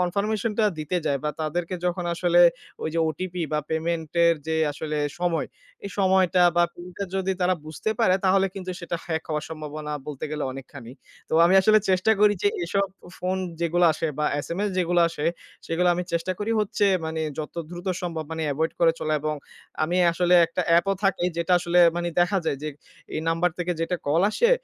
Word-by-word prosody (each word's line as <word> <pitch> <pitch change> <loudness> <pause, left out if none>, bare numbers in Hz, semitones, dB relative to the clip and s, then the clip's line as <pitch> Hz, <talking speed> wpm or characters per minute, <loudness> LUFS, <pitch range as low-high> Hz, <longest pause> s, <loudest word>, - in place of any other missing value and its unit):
কনফার্মেশনটা 210 +4 0
দিতে 155 +4 -2
যায় 140 -1 +1
বা 150 - +1
তাদেরকে 170 +4 -2
যখন 180 0 -1
আসলে 175 0 +3 0.4
ওই - - -1
যে 165 - +1
ওটিপি 180 +3 -4
বা 150 - +2
পেমেন্ট 160 0 -2
এর 170 - +5
যে 160 0 0 0.2
আসলে 150 +1 -4 0.2
সময়, 170 -4 0 0.4
এই 200 - -5
সময়টা 185 -1 +4
বা 175 - +5
পিনটা 180 +3 -7
যদি 190 0 0
তারা 180 +1 +3
বুঝতে 155 +7 -3
পারে 185 -5 +4
তাহলে 195 +1 +4
কিন্তু 185 -1 -5
সেটা 170 0 -3
হ্যাক 160 -2 -2
হওয়ার 150 -1 -2
সম্ভাবনা 150 -1 -6
বলতে 145 -3 -5
গেলে 155 -1 -2
অনেকখানি। 135 -2 -10 0.4
তো - - -2
আমি 180 +3 +4
আসলে 215 +3 +5
চেষ্টা 185 +4 +3
করি 210 0 +5
যে 205 - +4 0.2
এসব 200 +3 0 0.3
ফোন 185 +1 -1 0.2
যেগুলা 170 +1 +3
আসে 160 - -2
বা 150 - +1 0.2
SMS 200 +4 -2
যেগুলা 175 -1 +3
আসে, 160 -1 -3 0.4
সেগুলা 175 +2 +1
আমি 180 +1 -2
চেষ্টা 170 +2 0
করি 210 +2 -1
হচ্ছে 205 0 +1 0.2
মানে 160 0 -3 0.2
যত 155 +1 -5 0.2
দ্রুত 175 +2 -8 0.2
সম্ভব 165 -3 -3
মানে 160 - -3
এভয়েড 160 +3 -1
করে 165 -1 +5
চলা 155 0 0
এবং 155 0 -1 0.5
আমি 175 +3 -1 0.2
আসলে 180 +1 +2
একটা 170 +2 -2
অ্যাপও 175 +4 +4
থাকে 195 -2 +1
যেটা 170 +1 0
আসলে 175 0 +1 0.2
মানি 175 0 -1
দেখা 195 +3 +2
যায় 140 - -1
যে, 155 - -2 0.5
এই 155 - -1
নাম্বার 165 +2 +2
থেকে 175 0 -1
যেটা 170 +2 0
কল 155 +5 +3
আসে, 475 - +2
175 Hz, 190 wpm, -25 LUFS, 160-185 Hz, 0.5 s, এর